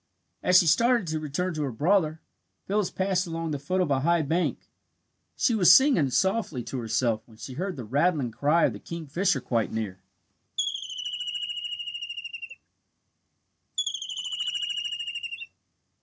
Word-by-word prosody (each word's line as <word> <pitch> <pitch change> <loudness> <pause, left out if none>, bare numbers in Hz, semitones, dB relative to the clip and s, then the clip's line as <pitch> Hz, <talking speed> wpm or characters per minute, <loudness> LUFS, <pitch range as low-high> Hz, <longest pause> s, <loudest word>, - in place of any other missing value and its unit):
As 180 0 +5
she 180 - +6
started 235 +6 +4
to 155 0 -1
return 155 +5 -2
to 155 - -3
her 140 -3 -1
brother, 160 - +1 0.4
Phyllis 205 -1 0
passed 190 -1 0
along 165 -1 -3
the 145 - -2
foot 185 +7 0
of 170 -5 0
a 135 - +3
high 170 +3 +2
bank. 165 +5 -1 0.7
She 235 - +2
was 185 -5 +6
singing 200 - +6
softly 190 - 0
to 130 - -4
herself 115 -1 0
when 110 -2 -17
she 130 - -8
heard 185 +6 -3
the 125 - -6
rattling 140 +1 +1
cry 150 +8 +3
of - - +1
the - - -8
kingfisher 170 +4 -1
quite 115 -3 0
near. 105 -4 -3
160 Hz, 125 wpm, -27 LUFS, 135-185 Hz, 0.7 s, she